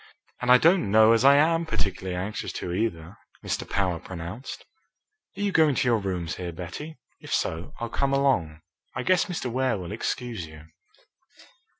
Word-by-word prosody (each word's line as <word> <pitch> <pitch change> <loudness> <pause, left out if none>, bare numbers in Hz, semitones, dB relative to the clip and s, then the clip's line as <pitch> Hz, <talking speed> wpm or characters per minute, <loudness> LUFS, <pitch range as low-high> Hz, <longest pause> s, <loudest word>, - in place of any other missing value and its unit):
"And 125 0 +2
I 125 - +10
don't 165 - +3
know 110 +2 +6
as 115 +1 +2
I 140 +1 +8
am 165 +3 +3
particularly 95 - -3
anxious 95 +4 -4
to, 90 - -4
either," 90 -4 -3 0.3
Mr. - - -3
Power 95 -4 0
pronounced. 90 +9 -8 0.7
"Are - - -4
you 205 -1 +1
going 155 -5 +4
to 125 - +1
your 115 -2 +3
rooms 90 -4 -3
here, 90 -1 -4
Betty? 90 - -7 0.2
If - - -11
so, 85 - -2
I'll 120 - -2
come 140 +3 0
along. 125 - +1 0.3
I - - -2
guess 185 0 +3
Mr. 170 -10 -4
Ware 130 -2 +1
will 90 0 -7
excuse 115 -3 -3
you." 80 -1 -13
110 Hz, 175 wpm, -26 LUFS, 90-140 Hz, 0.7 s, I